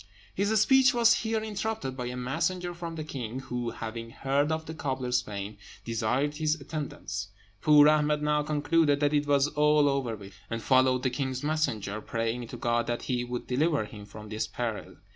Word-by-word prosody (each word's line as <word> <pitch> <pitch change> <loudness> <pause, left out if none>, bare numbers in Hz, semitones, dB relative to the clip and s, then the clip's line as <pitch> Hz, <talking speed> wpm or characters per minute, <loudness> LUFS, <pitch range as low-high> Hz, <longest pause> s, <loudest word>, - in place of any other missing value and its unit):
His 205 +3 +2
speech 265 +3 +5
was 235 -1 +6
here 225 -1 -1
interrupted 215 -9 -3
by 125 -2 -4
a 125 - -4
messenger 165 +8 -1
from 170 -1 -6
the 155 - -4
king, 130 -5 -5
who, 125 -2 -3
having 115 0 -6
heard 140 +5 0
of 160 0 -2
the 160 - -6
cobbler's 130 -5 -1
fame, 100 -2 -6 0.3
desired 120 +6 0
his 155 -1 +1
attendance. 135 - -5 0.3
Poor 150 -1 +7
Ahmed 150 -1 +3
now 150 0 +2
concluded 150 0 +2
that 145 0 +2
it 145 0 +1
was 140 -1 +4
all 150 0 +4
over 135 -5 0
with 100 -2 -12
him, - - -24
and 115 0 -4
followed 130 -1 +3
the 130 - +1
king's 130 0 -3
messenger, 125 -10 -1
praying 115 +1 -2
to 120 - -8
God 120 0 0
that 120 0 -2
he 125 -2 -1
would 125 0 -4
deliver 145 -1 +1
him 105 -1 -10
from 105 +1 -10
this 110 0 -2
peril. 115 0 -4
135 Hz, 190 wpm, -28 LUFS, 120-155 Hz, 0.3 s, Poor